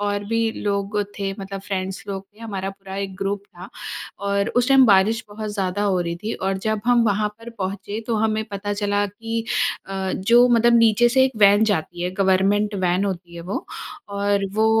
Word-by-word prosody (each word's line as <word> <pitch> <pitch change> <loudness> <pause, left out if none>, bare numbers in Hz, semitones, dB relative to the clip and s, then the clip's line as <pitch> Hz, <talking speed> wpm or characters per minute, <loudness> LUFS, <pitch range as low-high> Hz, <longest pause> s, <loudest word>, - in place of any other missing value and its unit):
और 205 0 -1
भी 230 +1 0
लोग 200 +1 -1 0.2
थे 195 -1 -2
मतलब 195 0 -6
फ्रेंड्स 190 -1 -4
लोग 195 -1 -4
थे - - -23
हमारा 195 -4 -4
पूरा 195 0 -10
एक 195 -1 -4
ग्रुप 200 +1 -2
था। 175 +1 -12 0.6
और 200 +1 +1
उस 245 +1 +3
टाइम 270 -1 +7
बारिश 215 +2 +4
बहुत 215 +1 -5
ज़्यादा 195 0 -1
हो 190 -3 +2
रही 170 -1 -2
थी 210 +6 -4
और 190 0 -2
जब 215 +2 -1
हम 245 -1 +5
वहाँ 210 0 +1
पर 230 +1 -9
पहुँचे 200 +2 -4
तो 235 - 0
हमें 220 0 0
पता 205 +1 -3
चला 205 0 0
कि 225 +3 -4 0.4
अ, 190 -1 -3
जो 240 +5 +5
मतलब 235 0 +5
नीचे 230 +1 +5
से 260 +2 +4
एक 265 - 0
वैन 205 +2 +7
जाती 175 -4 -1
है 180 - -1
गवर्नमेंट 195 +2 +2
वैन 180 +3 +2
होती 175 -3 -4
है 170 - -7
वो - - -2 0.4
और 200 0 0
वो 220 +1 +3
205 Hz, 200 wpm, -22 LUFS, 195-220 Hz, 0.6 s, टाइम